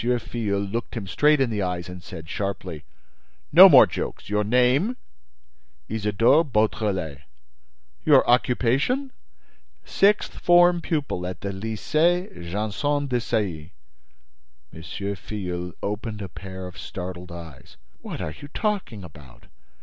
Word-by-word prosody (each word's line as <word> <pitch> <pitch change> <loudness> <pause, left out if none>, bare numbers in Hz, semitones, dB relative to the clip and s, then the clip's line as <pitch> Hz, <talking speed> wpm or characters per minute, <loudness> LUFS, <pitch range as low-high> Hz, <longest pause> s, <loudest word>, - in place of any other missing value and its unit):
Filleul 115 -4 -1
looked 115 +2 -4
him 105 - -4
straight 150 +10 +3
in 130 -3 +1
the 105 -2 -1
eyes 90 -2 -3
and 90 0 -9
said, 80 -2 -10
sharply: 90 -4 -4 0.7
"No - - +10
more - - +9
jokes! - - -6
Your 105 0 +2
name?" 125 - +2 0.9
"Isidore 110 - +3
Beautrelet." 105 - -1 0.8
"Your - - +5
occupation?" 130 - +1 0.7
"Sixth 205 +2 +2
form 175 0 +5
pupil 140 - -2
at 90 -2 -7
the 100 - -3
Lycée 155 - 0 0.2
Janson 110 +9 -1
de 125 -3 -1
Sailly." 90 -8 -3 1.0
M. 80 - -10
Filleul 90 0 -5
opened 105 0 -4
a 95 - -7
pair 95 0 -8
of 90 - -10
startled 90 -1 -7
eyes. 85 -5 -11 0.2
"What - - -7
are 75 - -4
you 145 - -8
talking 190 - -3
about? 75 -7 -14
105 Hz, 125 wpm, -24 LUFS, 90-130 Hz, 1.0 s, No